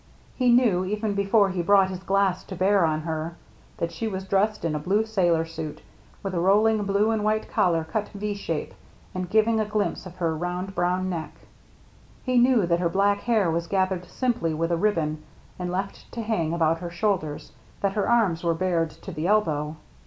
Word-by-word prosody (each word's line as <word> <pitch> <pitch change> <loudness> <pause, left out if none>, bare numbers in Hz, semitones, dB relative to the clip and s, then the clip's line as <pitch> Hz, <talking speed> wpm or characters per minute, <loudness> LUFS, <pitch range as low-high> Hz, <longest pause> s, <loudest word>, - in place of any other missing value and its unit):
He 250 -2 +3
knew, 235 -7 +4
even 210 +2 -2
before 200 0 +3
he 185 -1 -1
brought 195 +1 +4
his 185 - -5
glass 195 -1 +1
to 190 - -7
bear 190 0 +3
on 155 -1 0
her, 160 +1 -4 0.4
that 170 - -2
she 170 +7 -3
was 190 -3 -4
dressed 200 +1 0
in 165 - 0
a 150 - -1
blue 200 +8 +1
sailor 175 -7 +1
suit, 160 -2 -7 0.4
with 195 -1 -3
a 175 - 0
rolling 210 +3 +3
blue 200 +2 +2
and 220 -2 0
white 215 +1 0
collar 175 -7 +2
cut 205 +7 -3
V 205 +1 -4
shape 170 -6 -4 0.4
and 185 -1 -4
giving 220 +2 +3
a 215 - +1
glimpse 210 -2 -2
of 180 - -12
her 165 -3 -1
round 180 +3 -4
brown 180 +1 0
neck. 170 -4 -4 0.9
He 255 -1 +2
knew 245 -5 +4
that 170 0 +1
her 175 -1 +1
black 200 +3 +2
hair 215 -8 +1
was 170 +1 -2
gathered 190 -1 0
simply 235 -11 -1
with 165 +2 -1
a - - +3
ribbon 165 -5 0 0.4
and 180 -1 -3
left 195 +2 -5
to 230 - -4
hang 180 -8 -1
about 165 -1 +1
her 175 0 -5
shoulders, 170 -4 -2 0.3
that 200 -1 +1
her 205 +1 0
arms 205 -9 +2
were 170 -1 +1
bared 170 -2 0
to 155 - -10
the 155 +3 -3
elbow. 155 -7 +1
185 Hz, 200 wpm, -25 LUFS, 170-210 Hz, 0.9 s, knew